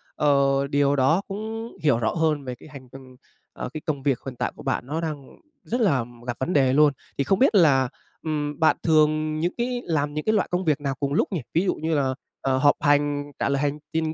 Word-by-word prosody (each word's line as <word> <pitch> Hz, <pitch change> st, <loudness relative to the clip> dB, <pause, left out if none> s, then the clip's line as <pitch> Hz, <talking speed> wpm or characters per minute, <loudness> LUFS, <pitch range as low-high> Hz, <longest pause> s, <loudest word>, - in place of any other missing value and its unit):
Ờ, 140 Hz, -1 st, +2 dB
điều 140 Hz, 0 st, +2 dB
đó 150 Hz, +8 st, +3 dB
cũng 220 Hz, +3 st, -5 dB
hiểu 135 Hz, -6 st, +3 dB
rõ 110 Hz, -, 0 dB
hơn 155 Hz, -3 st, 0 dB
về 125 Hz, -2 st, -5 dB
cái 155 Hz, -, -15 dB
hành 135 Hz, -3 st, -11 dB, 0.7 s
ờ, -, -, -5 dB
cái 155 Hz, -, -5 dB
công 140 Hz, -4 st, -2 dB
việc 135 Hz, -4 st, +1 dB
hiện 130 Hz, -2 st, -6 dB
tại -, -, -2 dB
của -, -, -12 dB
bạn -, -, -1 dB
nó 160 Hz, +3 st, -2 dB
đang 150 Hz, -4 st, -5 dB, 0.4 s
rất 245 Hz, +2 st, -2 dB
là 140 Hz, -, +2 dB, 0.2 s
gặp 120 Hz, -, -3 dB
vấn 130 Hz, +7 st, -1 dB
đề 135 Hz, -3 st, +3 dB
luôn. 150 Hz, 0 st, +5 dB, 0.2 s
Thì 140 Hz, -, +1 dB
không 195 Hz, +7 st, +1 dB
biết 260 Hz, -5 st, +4 dB
là, 135 Hz, -8 st, +4 dB, 0.3 s
ừm, 150 Hz, -2 st, -3 dB
bạn 160 Hz, -, +4 dB
thường 155 Hz, -1 st, +2 dB
những 175 Hz, +3 st, -1 dB
cái 245 Hz, 0 st, -2 dB
làm 150 Hz, -3 st, -1 dB
những 155 Hz, 0 st, -4 dB
cái 215 Hz, -, +2 dB
loại 205 Hz, -, +1 dB
công 180 Hz, +1 st, -1 dB
việc 150 Hz, -2 st, +1 dB
nào 135 Hz, -2 st, -2 dB
cùng 140 Hz, -1 st, -1 dB
lúc -, -, +2 dB
nhỉ, 180 Hz, -6 st, -2 dB
ví 170 Hz, +4 st, +2 dB
dụ -, -, +1 dB
như 160 Hz, +1 st, -2 dB
là, 135 Hz, -2 st, +1 dB, 0.3 s
ờ, 130 Hz, -1 st, +1 dB
họp 145 Hz, +2 st, +4 dB
hành, 145 Hz, -1 st, +1 dB
trả -, -, 0 dB
lời 140 Hz, 0 st, 0 dB
hành 145 Hz, 0 st, -1 dB
chinh 160 Hz, -1 st, 0 dB
150 Hz, 240 wpm, -24 LUFS, 140-160 Hz, 0.7 s, luôn